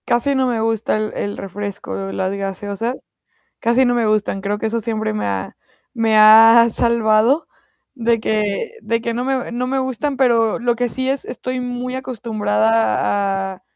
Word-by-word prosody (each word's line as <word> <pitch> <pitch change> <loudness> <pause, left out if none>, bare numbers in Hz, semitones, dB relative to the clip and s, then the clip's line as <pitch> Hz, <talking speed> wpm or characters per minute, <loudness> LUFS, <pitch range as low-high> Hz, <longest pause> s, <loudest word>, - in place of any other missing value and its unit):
Casi 240 +4 +1
no 260 -1 +1
me 240 -2 -1
gusta 225 -1 0
el 215 0 -3
el 205 0 -4
refresco, 195 0 -6
las 190 0 -2
gaseosas. 200 +5 -4 0.6
Casi 235 +3 +2
no 245 -1 +2
me 235 -2 +1
gustan. 215 -2 0
Creo 205 +1 -2
que 220 - -2
eso 230 +1 -1
siempre 220 -1 -2
me 215 - -3
ha 95 -1 -4 0.4
me 225 -2 +1
ha 225 +2 +8
salvado 235 +5 +2 0.5
de 235 -3 0
que 215 - -1
de 230 0 -1
que 235 0 -3
no 245 +2 -2
me 260 -2 -2
no 245 +1 -2
me 265 +1 -1
gustan. 265 +2 -2
Pero 235 -4 +2
lo 240 0 0
que 245 +1 -1
sí, 260 +2 -3
es 270 0 -1
estoy 255 +1 -5
muy 250 0 -4
acostumbrada 195 - 0
a 185 - -21
225 Hz, 175 wpm, -19 LUFS, 205-245 Hz, 0.6 s, ha